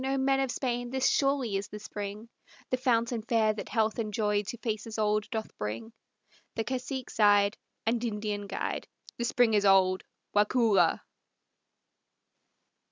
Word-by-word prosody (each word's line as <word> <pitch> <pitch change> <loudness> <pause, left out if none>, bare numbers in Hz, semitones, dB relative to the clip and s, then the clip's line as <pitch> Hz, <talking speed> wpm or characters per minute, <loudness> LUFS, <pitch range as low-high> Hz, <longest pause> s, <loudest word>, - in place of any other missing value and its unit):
O 270 +1 0
men 270 0 +2
of 270 -1 0
Spain! 245 -1 -2
This 265 +1 +1
surely 275 -7 +2
is 195 - -4
the 210 - -8
spring, 205 +1 -6 0.4
The 255 - +2
fountain 235 -2 +1
fair 220 -1 +2
that 210 - -7
health 220 0 +1
and 215 -2 -2
joy 210 -1 +1
to 215 +4 -6
faces 220 -1 -4
old 210 0 +1
doth 220 -3 -4
bring!" 110 - -4 0.6
The 225 - 0
cacique 255 +1 -4
sighed, 205 -1 +4 0.3
And 230 +1 +1
Indian 210 -2 -3
guide, 195 - -3 0.3
"The 235 - 0
spring 240 -1 +3
is 205 -1 +3
old, 190 -1 +4 0.3
Waukulla!" 205 -4 +3
220 Hz, 150 wpm, -29 LUFS, 205-245 Hz, 0.6 s, sighed